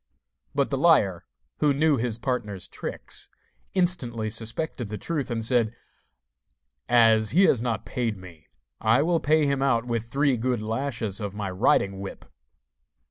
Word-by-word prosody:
But - - +1
the - - 0
liar, - - +3 0.3
who 145 -2 +3
knew 150 0 +3
his 115 -1 -1
partner's 115 -7 -3
tricks, - - -6 0.5
instantly 125 - +1
suspected 115 +2 -3
the 105 - -4
truth, 145 -2 -3
and 115 -2 -1
said: 115 -2 +2 1.1
'As 115 -3 +5
he 185 +6 +4
has 125 -11 +4
not 120 -2 -2
paid 115 -5 -2
me, 85 -4 -14 0.3
I 115 +6 +3
will 170 0 +2
pay 155 0 +3
him 140 -1 0
out 125 -4 +2
with 115 -1 -3
three 140 -2 +2
good 125 +1 0
lashes 110 -2 -2
of 105 -2 -5
my 100 -2 -3
riding 95 +1 +2
whip. 95 0 -8
120 Hz, 150 wpm, -25 LUFS, 110-140 Hz, 1.1 s, As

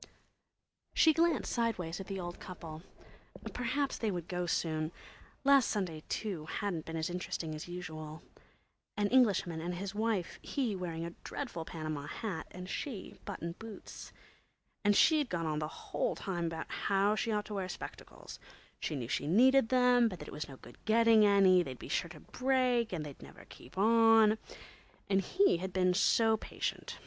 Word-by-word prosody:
She 315 - +6
glanced, 330 -2 +2
sideways, 190 -8 -1
at 195 - -7
the 195 -1 -4
old 175 -1 -6
couple. 165 -4 -8 0.7
Perhaps 260 +3 -1
they 225 - 0
would 175 -4 -3
go 180 -1 -2
soon. 155 -2 0 0.5
Last 275 -2 +6
Sunday, 180 -7 -2
too, 180 -8 -3
hadn't 180 -3 -3
been 165 0 -4
as 160 - -1
interesting 175 -3 -3
as 155 +2 -6
usual. 160 -3 -7 0.7
An 205 -1 +1
Englishman 200 -10 +3
and 175 +2 -3
his 195 +2 -4
wife, 215 -4 -1
he 245 -7 -1
wearing 170 -3 -4
a 170 - -5
dreadful 235 - -5
Panama 155 -3 -5
hat 195 -8 -4
and 180 0 -8
she 225 +1 -5
button 170 - -4
boots. 225 -2 -9 0.7
And 205 0 +4
she'd 305 0 +5
gone 170 -2 -2
on 155 -1 -1
the 155 - -2
whole - - -3
time 175 -4 -3
about 165 0 -4
how 200 +1 +2
she 225 +1 -1
ought 210 -1 0
to 210 - -7
wear 190 -2 -3
spectacles; - - -9 0.4
she - - -2
knew 125 -4 -4
she 135 +3 -1
needed 250 - +5
them; 250 -2 +5
but 185 -5 -5
that - - -9
it - - -9
was 150 0 -5
no 135 - -10
good 120 0 -15
getting 225 0 +5
any; 195 -2 +6
they'd 130 -7 -5
be - - -9
sure 170 - 0
to 155 -2 -11
break 255 -3 +1
and 160 -4 -3
they'd 145 -2 -10
never - - -13
keep 125 - -14
on. 225 0 +5 0.7
And 195 0 +4
he'd 190 - +2
been 185 -1 +3
so 220 +3 +4
patient. - - -4
190 Hz, 175 wpm, -33 LUFS, 165-225 Hz, 0.7 s, She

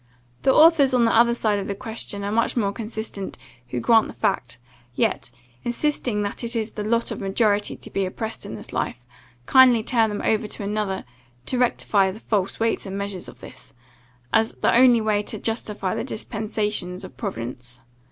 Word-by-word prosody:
The 265 - +4
authors 305 -4 +6
on 240 -2 +4
the 230 - +2
other 235 +1 +5
side 215 -3 +1
of 195 - -4
the 200 - -3
question 220 -2 -5
are 200 - -2
much 230 +3 +1
more 200 -4 +1
consistent, 220 -2 -6 0.3
who 125 0 -3
grant 225 - +4
the - - -9
fact; 125 - -1 0.4
yet, - - 0 0.3
insisting 240 -4 -1
that 205 +4 -4
it 235 +1 -2
is 220 -1 -1
the 210 - -5
lot 230 +2 0
of - - -4
the 195 - -5
majority 205 +1 +1
to - - -10
be 195 -1 0
oppressed 220 +4 -5
in - - -7
this - - -9
life, 120 0 -3 0.4
kindly 250 - +6
turn 225 -2 +2
them 205 - -4
over 215 -1 +1
to 210 - -6
another, 205 -1 -2 0.4
to 255 - -1
rectify 205 -5 +2
the 195 +3 -7
false 200 -4 -1
weights 225 -2 0
and 195 +1 -4
measures 200 -2 -4
of - - -13
this, 125 - -10 0.6
as 220 0 +3
the - - +1
only 245 -1 +6
way 215 -1 +1
to 215 - -5
justify 210 -3 -3
the - - -2
dispensations 210 -5 -3
of - - -10
Providence. 125 - -6
215 Hz, 190 wpm, -23 LUFS, 200-230 Hz, 0.6 s, authors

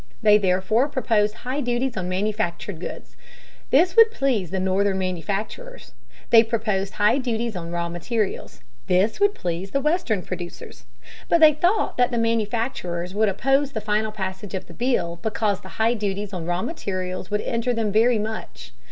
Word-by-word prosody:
They 210 -1 +6
therefore 190 +6 +2
proposed 220 -6 +1
high 265 +4 -1
duties 245 0 -1
on 180 -1 -3
manufactured 200 -2 -2
goods. - - -8 0.5
This 340 +6 +4
would 455 0 +8
please 260 - 0
the 190 - -2
Northern 190 +1 +1
manufacturers. 195 - -4 0.4
They 230 - +9
proposed 215 -4 -1
high 215 +5 +3
duties 235 -3 -2
on 170 -2 -5
raw 170 0 -2
materials. 190 +5 -3 0.3
This 195 - +2
would 405 0 +3
please 175 +2 -3
the 275 - 0
Western 285 - 0
producers. 175 -1 -8 0.4
But 340 - +4
they 310 -1 +8
thought 355 +8 +1
that 250 0 +3
the 240 - -2
manufacturers 225 -6 -1
would 215 +1 +2
oppose 270 +7 +1
the 220 - -2
final 215 +1 0
passage 190 -1 -5
of 190 - -4
the 170 - -13
bill 175 -7 -1
because 215 -3 -1
the 190 - -12
high 225 +2 +3
duties 205 -2 -3
on 170 -3 -4
raw 175 +1 -1
materials 185 - -4
would 210 0 0
injure 235 +1 -1
them 220 -2 0
very 225 +3 +4
much. 210 - -6
215 Hz, 170 wpm, -23 LUFS, 185-240 Hz, 0.5 s, They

